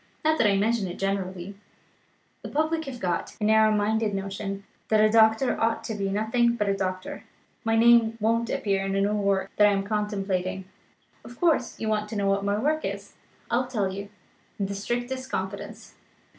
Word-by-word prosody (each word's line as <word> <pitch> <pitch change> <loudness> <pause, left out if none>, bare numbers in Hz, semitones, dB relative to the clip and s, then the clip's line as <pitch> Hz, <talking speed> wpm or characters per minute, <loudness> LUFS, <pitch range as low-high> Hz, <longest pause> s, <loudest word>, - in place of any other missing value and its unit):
Not 315 0 +3
that 230 - +5
I 200 -1 +3
mention 215 0 +1
it 175 - -7
generally; 195 -1 -3 0.9
the - - -7
public 315 +2 0
have 260 -3 -7
got 180 -4 -2
a - - -4
narrow 220 0 +5
minded 215 0 +1
notion 195 0 -4 0.2
that 215 - +3
a 215 0 +5
doctor 220 +3 +4
ought 225 0 +1
to 220 - -4
be 200 -2 -2
nothing 225 +4 +1
but 210 -3 -1
a 200 - +2
doctor. 185 -1 -4 0.4
My 225 -1 +1
name 230 -1 +5
won't 230 +2 +1
appear 195 -2 0
in 195 0 -2
a 195 - +2
new 205 +1 +1
work 195 -2 0
that 210 - +7
I - - +4
am 195 0 0
contemplating. 195 -3 -2 0.6
Of 240 - -12
course, 320 -8 +1
you 220 - -3
want 210 -1 0
to 220 - -6
know 200 -1 0
what 195 0 +1
my 200 0 +1
new 215 - -3
work 310 +2 +1
is. - - -5 0.4
I'll 245 +2 +1
tell 205 -7 -1
you, 200 +1 -6 0.5
in 200 - -1
the 200 - -4
strictest 245 +6 -3
confidence. 190 +1 -5
210 Hz, 200 wpm, -26 LUFS, 195-230 Hz, 0.9 s, that